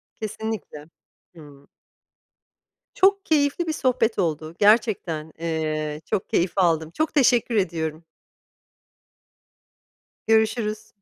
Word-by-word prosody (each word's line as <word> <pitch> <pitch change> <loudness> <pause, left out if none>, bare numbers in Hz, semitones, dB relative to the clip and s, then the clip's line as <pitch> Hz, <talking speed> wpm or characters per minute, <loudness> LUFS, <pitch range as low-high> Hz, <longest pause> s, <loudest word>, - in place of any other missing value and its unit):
Kesinlikle. 220 -8 -6 0.5
Hımm. 145 -3 -15 1.3
Çok 395 +1 +3
keyifli 305 +2 +1
bir 315 - -1
sohbet 245 -6 0
oldu, 160 -2 -2
gerçekten, 205 -8 +2
eee, 155 -2 -3
çok 190 - -2
keyif 175 0 +1
aldım. 165 -4 +2
Çok 315 - -2
teşekkür 245 -4 +3
ediyorum. 165 -4 -1 2.2
Görüşürüz. 220 -1 +1
195 Hz, 85 wpm, -23 LUFS, 160-230 Hz, 2.2 s, Çok